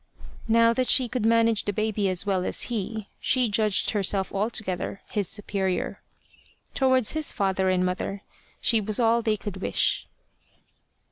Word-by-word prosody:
Now 230 +1 +4
that 255 +1 -1
she 255 -2 +5
could 235 -2 -1
manage 230 -1 +2
the 205 - -1
baby 215 -1 -1
as 185 +1 -2
well 190 -2 0
as - - +3
he, 220 -1 -4
she 250 -3 +2
judged 210 -1 +2
herself 195 -2 0
altogether 200 -2 -2
his 205 -4 0
superior. 195 -3 -2 0.7
Towards 260 -4 +2
his 315 -1 0
father 190 -1 0
and 185 0 +1
mother, 190 +2 -3 0.4
she 225 -1 +2
was 210 +2 -2
all 230 0 +3
they 220 -2 0
could 200 -1 -7
wish. 190 - 0
210 Hz, 150 wpm, -25 LUFS, 195-230 Hz, 0.7 s, she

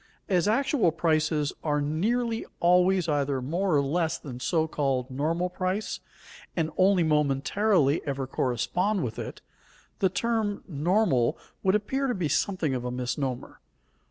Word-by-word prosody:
As 185 0 +2
actual 235 - +2
prices 155 -2 +1
are 150 -2 +1
nearly 225 +11 0 0.2
always 180 +1 +4
either 140 -3 0
more 170 +7 0
or 140 - +3
less 165 +3 0
than 125 -4 -8
so 160 +4 +1
called 135 -4 -1
normal 160 +7 0
price, 185 +3 -2 0.6
and 160 -2 0
only 185 -1 +4
momentarily 150 +2 +2
ever 135 -1 -3
correspond 135 - 0
with 115 -2 -4
it, - - -7 0.6
the 190 - +3
term 215 +1 -1
"normal" 165 - +1 0.2
would 190 +1 +3
appear 265 +6 0
to 245 - 0
be 180 -5 -1
something 175 -7 0
of 125 -1 -2
a 125 - -2
misnomer. 125 +1 -4
165 Hz, 140 wpm, -27 LUFS, 140-195 Hz, 0.6 s, always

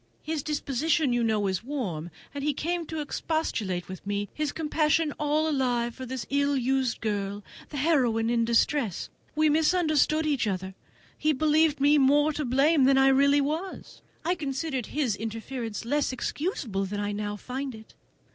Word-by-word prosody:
"His 315 -1 -2
disposition, 295 -1 0
you 240 -1 +1
know, 215 -2 +1
is 190 +2 -1
warm, 200 - -4 0.2
and 285 -1 -5
he 300 0 +1
came 340 +1 -2
to 320 -1 -3
expostulate 225 - -2
with 185 0 -8
me; 205 0 -2
his 305 -1 -2
compassion 310 0 +1
all 300 +1 +1
alive 245 -5 0
for 260 +1 -8
this 255 -3 -4
ill 280 0 +2
used 260 -1 0
girl, 205 -1 -2 0.3
this 290 -3 -3
heroine 250 -8 +2
in 235 0 +2
distress! 235 - +1 0.2
We 310 +1 +3
misunderstood 310 0 +3
each 285 -7 +1
other: 190 -1 -3 0.5
he 310 0 +2
believed 305 +1 +3
me 290 +2 +5
more 290 +3 +4
to 300 - -2
blame 275 +3 +4
than 270 0 +5
I 270 0 +6
really 280 +2 +4
was; 320 +7 -4 0.2
I 350 - +2
considered 275 -5 -3
his 270 -8 0
interference 225 +1 -5
less 290 +3 +1
excusable 255 - -2
than 205 +2 -4
I 205 0 -1
now 205 0 -3
find 255 +4 -5
it. 220 0 -14
270 Hz, 165 wpm, -27 LUFS, 225-300 Hz, 0.5 s, I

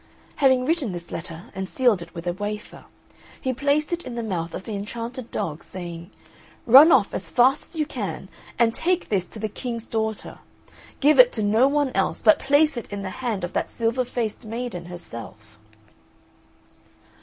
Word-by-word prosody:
Having 260 -3 +4
written 290 - 0
this 170 -1 -8
letter, 165 0 -7
and 190 0 -5
sealed 240 -8 +2
it 170 +1 -11
with 170 0 -7
a 175 - 0
wafer, 210 +2 -6 0.5
he 260 - -1
placed 290 +5 +1
it 345 - -2
in 240 - -7
the 235 - -3
mouth 175 -6 -3
of - - -6
the 220 - -6
enchanted 230 +4 -5
dog, 155 0 -4
saying, 175 -1 -8 0.6
"Run 275 +8 +9
off 225 -8 +4
as - - -3
fast 260 +2 +3
as - - -13
you 310 -1 0
can - - -5 0.3
and 230 -1 +3
take 360 +5 0
this 185 -4 0
to - - -12
the 215 0 -2
King's 230 +1 -5
daughter. 220 -2 -3 0.6
Give 290 0 +5
it 250 -1 +9
to 215 - -1
no 220 +5 +4
one 285 -1 +1
else, - - -1
but 315 - +6
place 285 +1 +3
it 235 - -6
in 200 -1 -4
the 190 - -4
hand 225 -7 -2
of 175 - -4
that - - -1
silver 230 +2 0
faced 235 -2 -3
maiden 225 -5 -5
herself." 110 - -10
225 Hz, 185 wpm, -24 LUFS, 185-260 Hz, 0.6 s, Run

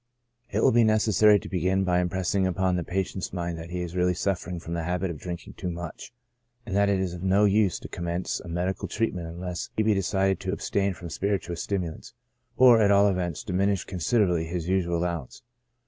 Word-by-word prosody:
It - - 0
will - - +6
be 120 0 +5
necessary 110 -1 +5
to - - -8
begin 95 +2 +1
by 90 -1 +2
impressing 95 +2 0
upon 95 0 +1
the 90 - -1
patient's 95 +1 -3
mind 85 -2 -3
that 80 +1 -8
he 90 0 -3
is 85 0 -7
really 90 0 +2
suffering 90 -2 -2
from 85 0 -7
the 85 - -1
habit 90 +2 -1
of 80 - -8
drinking 90 -1 -7
too 90 - -3
much, 85 +3 -7 0.5
and 100 -5 -4
that 100 0 +3
it 100 -1 +2
is 95 -2 -2
of 90 - -7
no 95 +2 +3
use 100 -2 +3
to - - -9
commence 85 +1 -3
a - - -11
medical 90 +3 -2
treatment 95 -6 -2
unless 85 +1 -5
he 110 - +3
be 110 0 +3
decided 95 0 +1
to 95 0 -3
abstain 100 -1 -1
from 85 -1 -9
spirituous 95 -1 -2
stimulants, 90 -5 -4 0.4
or, 125 -3 +7
at 100 - +4
all 100 0 +5
events, 90 -3 -2
diminish 100 -2 0
considerably 90 -2 +1
his 85 0 -4
usual 90 -2 +1
allowance. 85 -6 -4
90 Hz, 205 wpm, -26 LUFS, 85-100 Hz, 0.5 s, or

